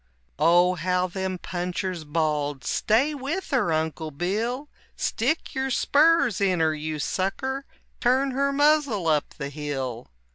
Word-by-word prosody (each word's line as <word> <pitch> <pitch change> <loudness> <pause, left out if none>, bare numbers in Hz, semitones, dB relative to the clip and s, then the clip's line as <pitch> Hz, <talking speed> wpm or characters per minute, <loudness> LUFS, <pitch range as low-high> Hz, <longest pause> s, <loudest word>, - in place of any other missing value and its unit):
Oh, 175 +2 +5
how 180 +1 0
them 185 0 -3
punchers 180 -1 -4
bawled, 150 -3 -1
"Stay 255 +8 +2
with 290 +7 -4
her, 250 -11 +2
Uncle 160 -1 -1
Bill! 215 - -2 0.3
Stick 315 - -1
your 265 0 -1
spurs 285 - +3
in 185 -3 +2
her, 160 -1 +3
you 155 0 -4
sucker! 260 - -2 0.3
turn 265 +2 +2
her 280 +2 +1
muzzle 285 - +2
up 150 -2 +1
the 140 -2 -4
hill!" 135 -5 -4
185 Hz, 135 wpm, -25 LUFS, 155-265 Hz, 0.3 s, Oh